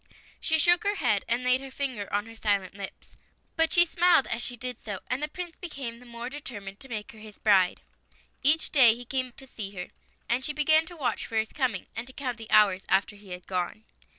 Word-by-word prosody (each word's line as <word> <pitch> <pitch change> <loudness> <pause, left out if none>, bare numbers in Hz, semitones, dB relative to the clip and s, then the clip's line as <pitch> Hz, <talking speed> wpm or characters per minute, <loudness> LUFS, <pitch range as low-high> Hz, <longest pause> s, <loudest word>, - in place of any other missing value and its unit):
She 320 - +2
shook 345 +3 +5
her 405 0 +1
head, 210 - +1
and 240 +2 0
laid 250 +1 +3
her 270 - -8
finger 260 -7 -4
on 205 +1 0
her 225 0 -12
silent 200 -4 0
lips. 195 -1 -10 0.4
But 325 0 +2
she 345 0 +7
smiled 345 -3 +4
as 235 - -2
she 245 - -3
did 250 0 -5
so, 205 -3 -5
and 255 +3 0
the 300 - 0
Prince 350 0 -7
became 270 -9 -6
the 250 - -15
more 235 0 -6
determined, 210 -8 -7
to 270 - -11
make 215 -3 -5
her 220 - -14
his 215 -1 -12
bride. 190 -4 +3 0.6
Each 305 +4 +4
day 245 -6 +7
he 245 +1 -9
came 255 0 -1
to 270 - -11
see 215 -6 -6
her, 180 -1 -6 0.4
and 245 +2 +1
she 295 - +1
began 310 +2 +3
to 345 - -9
watch 245 -7 -1
for 225 - -7
his 220 0 0
coming, 250 -9 -1
and 225 +3 -4
to 260 - -9
count 255 -5 -3
the 225 - -9
hours 200 -3 +5
after 195 +2 +2
he 205 -1 -15
had 180 0 -7
gone. 185 +3 -3
240 Hz, 235 wpm, -28 LUFS, 210-280 Hz, 0.6 s, she